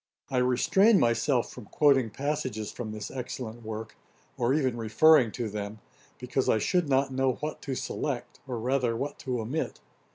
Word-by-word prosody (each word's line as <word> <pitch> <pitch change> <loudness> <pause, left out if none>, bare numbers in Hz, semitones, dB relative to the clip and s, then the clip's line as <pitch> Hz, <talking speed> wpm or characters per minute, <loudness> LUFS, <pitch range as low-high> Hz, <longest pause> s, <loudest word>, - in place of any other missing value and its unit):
] - - -40
I 130 - 0
restrain 190 - +4
myself 120 +2 +2
from - - -10
quoting 135 -2 +3
passages 130 -4 -3
from 110 -3 -6
this 105 -1 -6
excellent 120 -3 -6
work, 110 0 -6 0.4
or 120 +1 +1
even 135 -4 +1
referring 120 +3 +5
to 120 -3 -3
them, 105 0 -5 0.4
because 125 +2 -1
I - - +4
should 170 - +1
not 135 0 +2
know 130 0 +2
what 150 +4 -5
to 135 - -3
select, - - -4
or 125 -2 -3
rather, 125 0 0
what 145 +4 -4
to 125 -3 -2
omit. 125 +9 -3
125 Hz, 170 wpm, -28 LUFS, 115-140 Hz, 0.4 s, referring